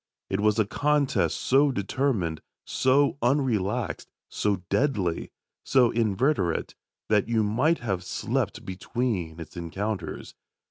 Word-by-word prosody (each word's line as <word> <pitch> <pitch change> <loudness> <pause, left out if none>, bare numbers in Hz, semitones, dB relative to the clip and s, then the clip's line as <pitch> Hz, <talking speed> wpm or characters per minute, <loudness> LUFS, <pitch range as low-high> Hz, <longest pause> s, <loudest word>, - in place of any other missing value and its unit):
It 95 - 0
was 105 +1 +2
a 110 - +3
contest 145 +5 +1
so 140 +2 +4
determined, 100 - -1 0.2
so 140 +2 +2
unrelaxed, 120 -5 0 0.2
so 100 -3 -1
deadly, 105 - 0 0.3
so 125 -3 +4
inveterate 110 - +1 0.4
that 105 +1 +2
you 115 -2 +2
might 130 +11 +2
have 95 -6 -2
slept - - -2
between 95 -3 -3
its 80 - -9
encounters. 95 +5 -4
110 Hz, 110 wpm, -26 LUFS, 95-130 Hz, 0.4 s, so